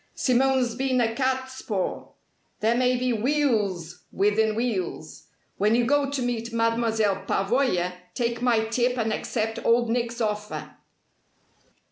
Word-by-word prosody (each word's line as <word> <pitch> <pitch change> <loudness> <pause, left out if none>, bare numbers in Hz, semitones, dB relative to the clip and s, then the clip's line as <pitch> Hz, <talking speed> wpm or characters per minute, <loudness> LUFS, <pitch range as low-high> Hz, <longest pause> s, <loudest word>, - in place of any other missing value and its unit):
Simone's 255 -1 +2
been 260 +1 0
a 225 -2 +1
catspaw. 260 -5 -2 0.5
There 220 +2 +2
may 250 0 +2
be 250 0 0
wheels 215 - 0
within 210 +2 +2
wheels. 200 -9 -3 0.3
When 210 +3 +3
you 240 0 +2
go 285 +1 +2
to 280 -2 -2
meet 235 -1 -2
Mademoiselle 230 -3 +1
Pavoya 195 -4 +1 0.2
take 235 -1 -1
my 235 -3 +2
tip 245 +2 0
and 220 -2 0
accept 225 -1 -2
Old 235 0 +3
Nick's 235 0 -1
offer." 210 -2 -3
235 Hz, 125 wpm, -25 LUFS, 215-250 Hz, 0.5 s, When